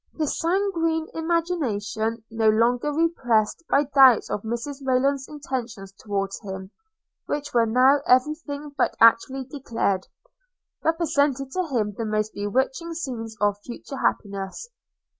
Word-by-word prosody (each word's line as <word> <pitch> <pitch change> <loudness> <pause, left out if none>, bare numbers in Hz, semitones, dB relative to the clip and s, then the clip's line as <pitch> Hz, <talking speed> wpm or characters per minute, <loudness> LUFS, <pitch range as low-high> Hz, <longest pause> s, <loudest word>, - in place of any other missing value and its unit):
His 305 -3 -1
sanguine 330 -3 0
imagination, 240 - -1
no 225 -1 +3
longer 240 +6 +2
repressed 285 -6 +1
by 280 - +4
doubts 270 -5 +5
of 210 - -2
Mrs 235 +6 -4
Rayland's 265 +1 +1
intentions 245 -9 -5
towards 195 0 -4
him, 190 -2 -7 0.6
which 290 0 -3
were 230 -1 +3
now 260 +5 +4
every 255 +4 +4
thing 295 -2 -8
but - - +1
actually 230 +4 +4
declared, 235 -8 -2 0.8
represented 290 -5 +1
to 370 +1 -1
him 220 -7 -1
the 230 - -3
most 215 0 -1
bewitching 265 +11 -1
scenes 230 -8 -5
of 205 0 +1
future 250 +4 -8
happiness. 200 - -2
255 Hz, 125 wpm, -24 LUFS, 220-295 Hz, 0.8 s, doubts